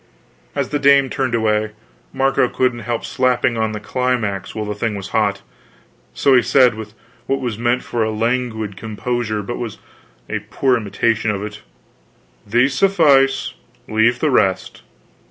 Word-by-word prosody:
As 140 -2 -1
the 145 - -1
dame 140 -1 +4
turned 130 -3 -1
away, 110 -1 0 0.4
Marco 135 -2 +1
couldn't 125 -2 0
help 115 -1 -2
slapping 125 -1 +1
on 110 -1 0
the 105 - -5
climax 110 -4 -2
while 110 -1 -3
the 105 - -3
thing 105 +1 -2
was 100 -1 -6
hot; 100 -2 0 0.7
so 140 - +2
he 125 - +6
said 125 -1 +4
with 110 0 -9 0.3
what 135 0 0
was 120 -5 -4
meant 120 +1 +1
for 120 - -3
a 110 - 0
languid 110 -2 -2
composure 110 +1 -3
but 120 +4 -5
was 115 -3 -5 0.5
a - - -2
poor 130 -2 +2
imitation 110 0 0
of 100 -1 -2
it: 105 0 -7 0.9
"These 120 +5 +2
suffice; 140 -6 +3 0.3
leave 110 +2 +2
the 155 - +2
rest." 95 -6 +1
120 Hz, 155 wpm, -19 LUFS, 110-130 Hz, 0.9 s, he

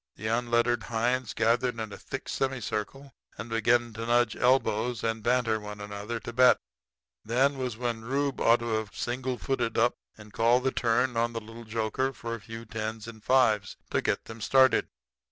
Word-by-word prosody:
The 110 - -9
unlettered 120 +1 +1
hinds 120 +2 -1
gathered 115 +1 +1
in 110 -2 -5
a - - -5
thick - - -7
semicircle 135 +1 -3 0.2
and 115 +3 -7
began 115 +1 +2
to 115 +1 -5
nudge 120 -1 +3
elbows 125 -2 +1
and 115 -1 -1
banter 120 -1 +1
one 105 0 -8
another 105 +3 -5
to 120 - -7
bet. 125 +1 +6 0.7
Then 135 +5 +1
was 125 -4 -3
when 120 -2 -3
Rufe 140 +3 -1
ought 115 +1 +4
to 120 - -3
have 110 -2 -8
single 125 +1 -2
footed 125 -4 -1
up 120 +2 +4 0.2
and 105 -1 -14
called 120 +2 +3
the 130 - +1
turn 120 +1 +1
on 115 +1 +1
the 115 - -2
little 115 +1 -11
joker 115 +4 -1
for 115 -2 -6
a 115 - -6
few 115 +3 -8
tens 110 0 -5
and 110 -2 -10
fives 110 -6 +2
to - - +1
get - - -1
them 110 0 -10
started. 130 +3 +4
115 Hz, 185 wpm, -28 LUFS, 110-125 Hz, 0.7 s, bet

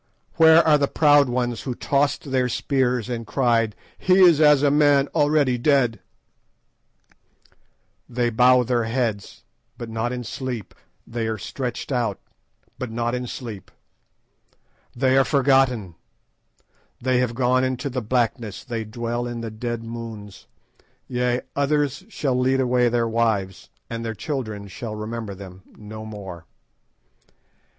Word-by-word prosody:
"Where 160 0 +7
are 150 -1 +5
the 140 - +2
proud 145 -3 +4
ones 120 -1 -1
who 125 -3 -4
tossed 140 +1 0
their 130 -1 +1
spears 125 -2 0
and 115 -3 -5
cried, 115 -5 +1 0.2
'He 185 - +3
is 170 -5 +6
as 150 -2 +6
a 145 - +4
man 145 -1 +4
already 145 -4 +2
dead'? 125 -5 +2 2.1
"They 120 -1 0
bow 125 +2 +5
their 120 -1 0
heads, 115 -4 -3 0.3
but 120 -2 -7
not 115 +2 -2
in 125 -1 -4
sleep; 120 -2 -5 0.3
they 115 -1 -3
are 110 -1 -2
stretched 125 +5 -5
out, 120 -6 -1 0.6
but 130 - -4
not 120 +1 -2
in 125 0 -3
sleep. 115 -6 -7 1.3
"They 130 +1 +3
are - - +5
forgotten; 130 - +2 1.1
they 130 0 +1
have 125 -2 -1
gone 130 +1 +2
into 130 +2 -2
the 130 -2 -3
blackness; 115 -2 -1
they 115 -2 -4
dwell 120 +2 -4
in 120 -1 -5
the 115 -1 -5
dead 115 +1 -4
moons; 115 -3 -8 0.6
yea, 125 0 0
others 145 +3 0
shall 150 - -1
lead 130 +1 +2
away 125 -1 +2
their 115 -1 +1
wives, 110 -5 -1 0.2
and 115 0 -5
their 115 -1 -4
children 110 -8 -4
shall 110 +3 -6
remember 110 -1 -5
them 95 -1 -11 0.2
no 110 +1 -9
more. 95 -6 -9
120 Hz, 140 wpm, -23 LUFS, 115-135 Hz, 2.1 s, Where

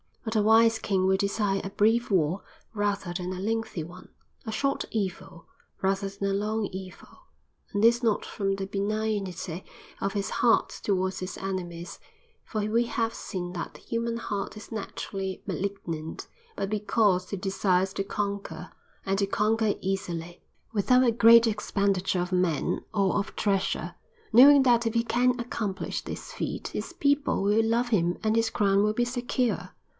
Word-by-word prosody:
But 225 0 -4
a 215 - +4
wise 225 +1 +5
king 190 -4 +1
will 190 0 +3
desire 200 0 0
a 195 - -4
brief 225 +4 +2
war 180 -1 +1 0.3
rather 205 -4 -1
than 180 +1 -3
a 185 - -6
lengthy 225 -4 -2
one, 180 +3 -12 0.4
a 220 - -3
short 275 +5 0
evil 190 -4 -4 0.4
rather 195 +1 0
than 200 0 -3
a - - 0
long 210 +2 0
evil. 185 -1 -10 0.4
And 205 +1 0
this 235 +1 +5
not 225 -4 +1
from 195 -1 -1
the 195 0 -4
benignity 200 -4 -2 0.4
of 195 - -1
his 200 -1 -2
heart 235 -2 +3
towards 190 -1 0
his 185 0 -5
enemies, 180 -3 -5 0.5
for 215 - -3
we 225 +3 +1
have 230 -1 -1
seen 175 -1 -5
that 175 - -5
the - - -12
human 230 0 -2
heart 205 -2 -4
is 215 - -11
naturally 195 -3 -5
malignant, 170 -5 -4 0.3
but 195 - -2
because 205 -3 +1
he 200 - -3
desires 190 0 +1
to 195 - -1
conquer, 200 -4 -4 0.3
and 195 +1 0
to 200 - +2
conquer 215 +1 +1
easily, 175 -3 -3 0.3
without 250 +5 +4
a 240 - +4
great 230 +1 +7
expenditure 195 -4 0
of 180 +1 -3
men 180 -4 0
or 195 -3 +2
of 200 +1 -3
treasure, 195 -3 0 0.4
knowing 275 +4 +9
that 235 -2 +4
if 225 - -1
he 230 - +3
can 245 +1 +2
accomplish 215 -5 -3
this - - -7
feat - - -4
his - - -5
people 285 -6 +1
will 210 +3 +3
love 235 +2 +1
him 175 -6 +1
and 220 0 +2
his 230 0 +2
crown 200 -2 +2
will 210 0 +2
be 240 +2 +1
secure. 245 0 -1
200 Hz, 165 wpm, -27 LUFS, 190-225 Hz, 0.5 s, knowing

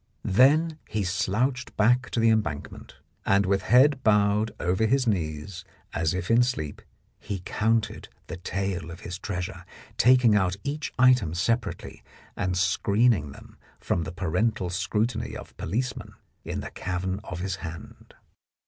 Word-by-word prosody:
Then 150 - +4
he 105 -1 -1
slouched 115 +8 -1
back 120 +4 +3
to - - -2
the 115 0 +4
Embank 105 -10 -1
ment, - - -13 0.3
and 100 0 +3
with 95 0 +1
head 130 +6 +4
bowed 105 0 +3
over 95 +5 +1
his 135 +2 +2
knees 85 -2 -2 0.3
as 85 +1 0
if 90 +3 -2
in 115 +1 +6
sleep, 120 - -2 0.4
he 100 -4 -5
counted 110 0 0 0.2
the - - -7
tale 90 -2 -3
of 85 - -9
his 90 +1 -6
treasure, 90 -4 -5 0.3
taking 125 -3 +5
out 95 -3 +2
each 150 +2 -3
item 125 -10 +4
separately, 115 +6 -2 0.3
and 90 0 -1
screening 100 - +2
them - - -14 0.2
from 85 - -1
the 80 - -5
parental 90 +2 -1
scrutiny 105 +5 -1
of - - -12
policemen 120 +9 -3 0.3
in - - -4
the - - -7
cavern 95 +1 -3
of 90 -4 -6
his 95 +1 -2
hand. 85 -2 -10
100 Hz, 150 wpm, -26 LUFS, 90-120 Hz, 0.4 s, in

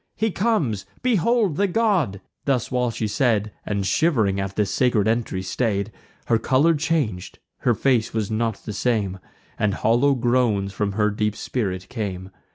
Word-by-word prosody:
He 220 -1 0
comes; 160 - 0 0.2
behold 225 - +2
the 200 - +3
god!" 180 - +1 0.2
Thus 130 -5 0
while 125 -1 +1
she 115 -1 -3
said, 110 -1 +1 0.2
(And 100 -2 -1
shiv'ring 105 - +2
at 95 0 -3
the 105 - +2
sacred 105 +1 +1
entry 110 -5 -1
stay'd,) 100 0 -1 0.3
Her 115 -1 +2
colour 135 +8 +3
chang'd; 145 - -1 0.2
her 120 - +2
face 120 0 +1
was 110 -2 -2
not 110 -1 -2
the 105 - -4
same, 100 -4 0 0.4
And 105 -2 +1
hollow 125 +5 +3
groans 120 -6 +1
from 100 0 -1
her 105 +1 +1
deep 105 +1 -1
spirit 95 -7 -3
came. 95 -5 -5
115 Hz, 160 wpm, -23 LUFS, 100-135 Hz, 0.4 s, the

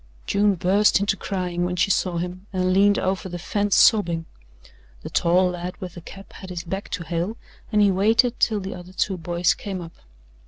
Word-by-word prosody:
June 205 0 +2
burst 195 +4 +3
into 200 0 +1
crying 180 -2 -3
when 180 0 -1
she 180 +2 +2
saw 180 -2 0
him 180 +3 -5
and 185 -1 0
leaned 200 +2 +4
over 190 0 -2
the 175 - -5
fence 205 +3 0
sobbing. 170 -7 +4 0.8
The - - -7
tall 180 +2 +3
lad 180 +1 -6
with 180 -2 -7
the 175 - -10
cap 195 +4 -12
had 190 - -10
his 175 -2 -5
back 190 +4 -5
to 170 - -3
Hale, 170 +6 -3 0.3
and 210 -1 +4
he 200 - +4
waited 225 +6 +2
till 215 -3 +2
the 190 +1 -5
other 180 +1 -11
two 190 +1 0
boys 175 0 +1
came 195 -3 -6
up. 165 -2 -9
185 Hz, 200 wpm, -23 LUFS, 175-200 Hz, 0.8 s, leaned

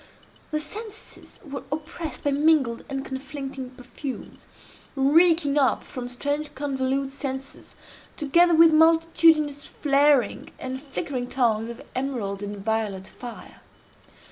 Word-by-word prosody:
The 305 - -1
senses 425 +7 -8
were 275 -1 -5
oppressed 310 +1 -5
by 285 - +1
mingled 280 -5 +2
and 270 -1 -3
conflicting 270 -1 -6
perfumes, 255 +2 -8 0.5
reeking 295 +1 +4
up 270 - +2
from 245 -1 -7
strange 290 +4 -3
convolute 270 -1 -1
censers, 270 -1 -6 0.4
together 340 +4 +4
with 325 0 +7
multitudinous 320 -2 +4
flaring 285 -2 +2
and 260 0 -5
flickering 275 -3 -4
tongues 230 -3 +1
of 235 +3 -8
emerald 240 -7 -3
and 205 -1 -6
violet 215 -4 -1
fire. 240 -1 -10
275 Hz, 115 wpm, -25 LUFS, 255-305 Hz, 0.5 s, with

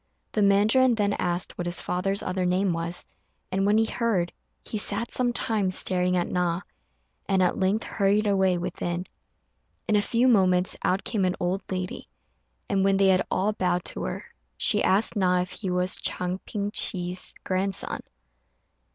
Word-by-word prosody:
The 215 - 0
mandarin 215 +6 +4
then 205 -2 +1
asked 175 0 -1
what 175 - -2
his 175 0 -2
father's 195 +2 -1
other 185 0 -1
name 180 +1 +1
was, 170 +1 -3 0.5
and 195 +1 +1
when 210 +1 +4
he 225 - +4
heard, 220 -7 0 0.3
he 215 - -3
sat 210 +3 0
some 245 -1 +3
time 215 -5 0
staring 180 0 +1
at 175 - 0
Na, 180 0 0 0.7
and 190 -2 +3
at 180 - +1
length 195 +3 +1
hurried 205 +1 +1
away 190 -3 +2
within. 175 0 -3 0.8
In 215 - +2
a 205 - +4
few 235 +4 +2
moments 185 -6 +3
out 190 +2 +1
came 205 -3 -1
an 185 0 +1
old 180 +2 -1
lady, 185 -1 -4 0.6
and 195 -2 +1
when 195 0 +3
they 195 0 +4
had 185 -1 +4
all 205 +3 +1
bowed 180 -3 0
to - - -5
her, - - -5 0.3
she - - +2
asked 200 +5 +2
Na 180 -3 +2
if 180 +1 -5
he 185 +1 -5
was 180 0 0
Chang 180 +1 -2
Ping 205 -1 -2
chih's 180 -2 -2
grandson. 190 +1 -1
190 Hz, 170 wpm, -26 LUFS, 180-205 Hz, 0.8 s, mandarin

